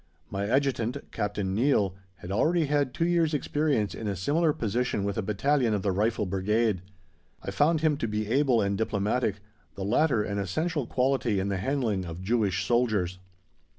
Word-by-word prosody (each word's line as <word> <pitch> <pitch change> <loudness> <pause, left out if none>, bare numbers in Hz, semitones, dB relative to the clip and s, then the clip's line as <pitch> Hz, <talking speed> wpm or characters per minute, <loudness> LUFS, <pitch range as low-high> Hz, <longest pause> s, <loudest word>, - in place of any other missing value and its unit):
My 100 +1 -2
Adjutant, 130 -1 0
Captain 105 -3 -2
Neill, 105 -4 +2 0.2
had 90 0 -9
already 160 - +2
had 145 -2 +1
two 165 - -1
years' 170 -3 +2
experience 145 - 0
in 110 - -5
a 100 - -1
similar 150 - +2
position 120 -3 -1
with 100 0 -2
a - - -1
battalion 115 +3 +1
of 100 - -3
the 100 - +1
Rifle 105 +3 0
Brigade. 100 +2 0 0.6
I - - -4
found 155 +1 +2
him 155 -2 +2
to 115 - -2
be 105 0 -2
able 125 -1 +2
and 100 0 0
diplomatic 105 0 -1 0.3
the 95 - -4
latter 120 +1 +2
an 100 -1 -3
essential 145 - -1
quality 125 -5 +1
in 95 +1 -1
the 100 - -1
handling 105 -3 -1
of 85 +2 -7
Jewish 105 -3 +1
soldiers. 105 -6 +1
110 Hz, 175 wpm, -27 LUFS, 100-140 Hz, 0.6 s, Neill